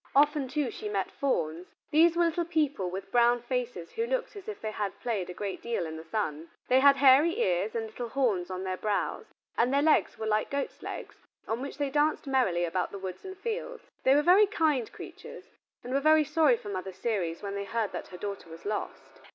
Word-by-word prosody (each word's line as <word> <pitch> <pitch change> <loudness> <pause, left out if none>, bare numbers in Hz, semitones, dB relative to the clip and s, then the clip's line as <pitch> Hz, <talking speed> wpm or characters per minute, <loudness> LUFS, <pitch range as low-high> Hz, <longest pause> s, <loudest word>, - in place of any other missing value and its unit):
Often, 290 -1 +4
too, 275 -2 -1
she 210 - -6
met 195 -2 -1
fauns. 175 - -2 0.2
These 330 +2 +5
were 345 - +4
little 335 +1 0
people 295 - 0
with 190 +2 -6
brown 240 0 +4
faces 240 -8 -3
who 460 +1 -2
looked - - -2
as 400 0 -10
if 430 - -5
they 220 - -4
had 205 -2 -4
played 215 -7 -2
a - - -5
great 200 -2 -4
deal 230 -7 -2
in 160 0 -6
the 160 - -8
sun. 165 -3 -3 0.2
They 255 - +6
had 280 +1 +7
hairy 275 +4 +5
ears 185 +4 +1
and 225 -1 -1
little 230 +2 -6
horns 220 -10 0
on 185 0 -4
their 185 -1 -2
brows, 210 0 -2 0.3
and 245 +2 +3
their 280 +1 +3
legs 315 0 +3
were 220 - -4
like 215 0 +1
goats' 280 0 -3
legs - - -7 0.3
on 225 +2 -2
which 275 0 -6
they 285 -2 -1
danced 300 +2 +1
merrily 250 -11 +2
about 180 +2 -1
the 200 - -7
woods 190 -2 -6
and 380 0 -8
fields. 470 +3 -5
They 265 - +5
were 295 - +4
very 385 +5 +6
kind 310 - +1
creatures, - - -11 0.3
and 250 - -5
were 275 - +3
very 310 +2 +5
sorry 300 -4 +3
for 205 - -9
Mother 190 -1 -4
Ceres 180 -5 -2
when 200 -1 -4
they 200 0 -3
heard 220 0 -1
that - - -6
her 180 - -10
daughter 200 -2 -6
was 165 +1 -11
lost. 210 0 -5
240 Hz, 225 wpm, -29 LUFS, 195-295 Hz, 0.3 s, had